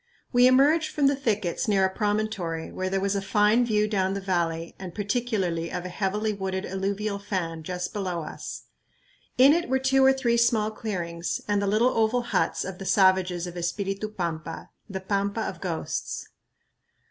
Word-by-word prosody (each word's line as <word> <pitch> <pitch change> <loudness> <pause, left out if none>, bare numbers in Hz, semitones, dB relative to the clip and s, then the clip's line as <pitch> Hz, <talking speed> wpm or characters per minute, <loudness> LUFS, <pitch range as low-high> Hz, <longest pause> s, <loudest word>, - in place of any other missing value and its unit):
We 245 +1 +7
emerged 295 +5 +4
from 290 - +1
the 280 +1 +4
thickets 215 -9 -1
near 195 -2 +3
a 190 - -1
promontory 205 -6 -1
where 185 0 -3
there 195 0 0
was 200 +1 0
a 200 - 0
fine 210 +4 +3
view 210 -3 +2
down 195 -2 0
the - - -2
valley 170 -3 -1
and 185 -2 -8
particularly 205 -6 -1
of 180 0 -4
a - - -4
heavily 210 +3 -1
wooded 190 -1 -3
alluvial 200 +2 -2
fan 175 -5 -3
just 180 +2 -4
below 185 -5 -2
us. 155 - -7 0.7
In 270 +3 +8
it 335 -4 0
were 265 - +3
two 265 0 +3
or 265 - +7
three 250 -3 +1
small 230 -2 +2
clearings 175 -6 -3
and 205 -1 +1
the 200 - 0
little 220 +5 +3
oval 225 +2 +2
huts 235 - 0
of 190 -1 -6
the 195 - -6
savages 185 -2 +3
of 175 -1 -7
Espiritu 195 +4 -2
Pampa, 165 -5 -5 0.2
the 190 -1 -4
"Pampa 200 +2 -1
of 185 -5 -4
Ghosts." 170 -4 -4
200 Hz, 180 wpm, -26 LUFS, 180-220 Hz, 0.7 s, In